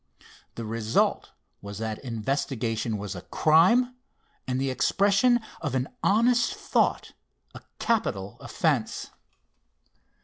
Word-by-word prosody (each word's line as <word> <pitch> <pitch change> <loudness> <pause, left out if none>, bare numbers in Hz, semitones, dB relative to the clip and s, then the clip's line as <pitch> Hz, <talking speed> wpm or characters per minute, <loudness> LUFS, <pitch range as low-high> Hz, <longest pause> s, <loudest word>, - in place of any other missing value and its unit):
The 115 - -5
result 110 0 0 0.3
was 100 0 -8
that 110 -1 -4
investigation 115 -2 -2
was 100 -1 -5
a 90 - -7
crime, 190 - +4 0.5
and 130 0 -1
the 135 0 0
expression 200 - +3 0.2
of 145 -5 -2
an 130 +1 -1
honest 240 - +3
thought 415 -1 0 0.4
a - - -10 0.2
capital 105 - -1
offence. - - -1
130 Hz, 105 wpm, -26 LUFS, -, 0.5 s, crime